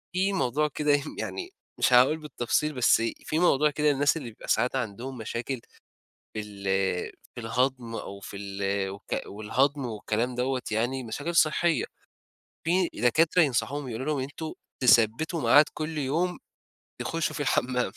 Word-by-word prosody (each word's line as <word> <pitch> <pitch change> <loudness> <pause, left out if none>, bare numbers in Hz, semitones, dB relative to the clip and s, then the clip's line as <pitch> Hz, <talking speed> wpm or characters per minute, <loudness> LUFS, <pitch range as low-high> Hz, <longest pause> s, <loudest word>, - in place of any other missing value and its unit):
في 195 +2 +2
موضوع 150 -3 +1
كده 150 +1 0 0.3
يعني 370 -1 -4 0.3
مش - - +3
هاقول 130 +6 +6
بالتفصيل 150 0 -1
بس 125 -3 +4 0.2
في 155 - 0
موضوع 150 -4 +4
كده 150 +1 +2
الناس 145 +3 +2
اللي 130 -6 -6
بيبقى 110 - -13
ساعات 125 +4 +2
عندهم 125 +2 -4
مشاكل 115 +3 -4 0.7
في 110 - -3
ال 100 -1 -10 0.7
في 120 - -6
الهضم 120 0 -1
أو 100 -2 -6
في 100 - -8
ال 100 0 -2
و 100 +1 -8 0.3
والهضم 130 +7 0
والكلام 115 +2 -2
دوَّة 130 +1 0
يعني 120 +4 0
مشاكل 145 +9 -4
صحية، 165 +1 +3 0.8
في 180 +1 +3
دكاترة 160 +8 +3
ينصحوهم 140 0 0
يقولوا 120 +4 -4
لهم 150 -2 0
أنتم 155 +4 -5 0.3
تثبِّتوا 125 - +4
ميعاد 150 - +7
كل 155 0 -4
يوم 165 +6 0 0.6
تخشّوا 165 -1 -2
في - - -5
الحمّام، 125 -5 +1
130 Hz, 145 wpm, -27 LUFS, 115-150 Hz, 0.8 s, ميعاد